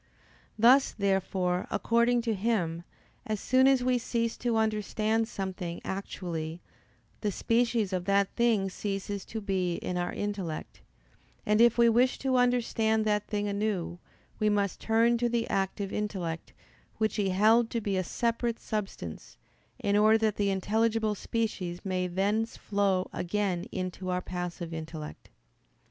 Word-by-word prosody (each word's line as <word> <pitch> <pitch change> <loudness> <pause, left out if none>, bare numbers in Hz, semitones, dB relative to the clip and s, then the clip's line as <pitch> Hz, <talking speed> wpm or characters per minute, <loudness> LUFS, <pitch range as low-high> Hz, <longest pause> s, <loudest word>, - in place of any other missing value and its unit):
Thus, 250 +5 +5
therefore, 190 -2 0
according 235 +3 +2
to 230 -2 0
him, 190 -6 0 0.5
as 215 -1 -1
soon 260 +4 +4
as 265 -2 +4
we 250 -1 +2
cease 230 -1 -1
to 240 -2 0
understand 220 +1 0
something 185 -5 -4
actually, 170 -4 -4 0.6
the 210 - -1
species 230 -1 +1
of 180 -1 -1
that 200 0 +2
thing 230 -5 +2
ceases 200 0 -4
to 220 - -5
be 185 -4 -1
in 180 +1 -3
our 175 0 -1
intellect, 195 -6 -4 0.6
and 210 +1 +3
if 235 0 +5
we 235 0 +6
wish 245 +3 +3
to 265 -1 +1
understand 225 -3 +2
that 210 -1 +1
thing 205 -1 -1
anew, 200 -4 -2 0.4
we 215 - +3
must 200 -2 0
turn 230 +1 +3
to 240 0 +1
the 235 -1 0
active 195 0 -1
intellect, 185 -6 -3 0.5
which 215 0 0
he 200 -2 +1
held 220 +5 +4
to 235 - -1
be 205 -3 -2
a 185 - +1
separate 235 +3 -1
substance, 195 - -5 0.4
in 200 0 0
order 215 +1 +6
that 220 -2 +1
the 200 -1 +1
intelligible 220 +3 +1
species 195 -5 -3
may 185 -1 0
thence 205 +5 0
flow 200 -2 0
again 185 -1 -1
into 185 0 -4
our 180 0 0
passive 175 -1 -5
intellect. 155 -1 -7
205 Hz, 145 wpm, -29 LUFS, 185-225 Hz, 0.6 s, we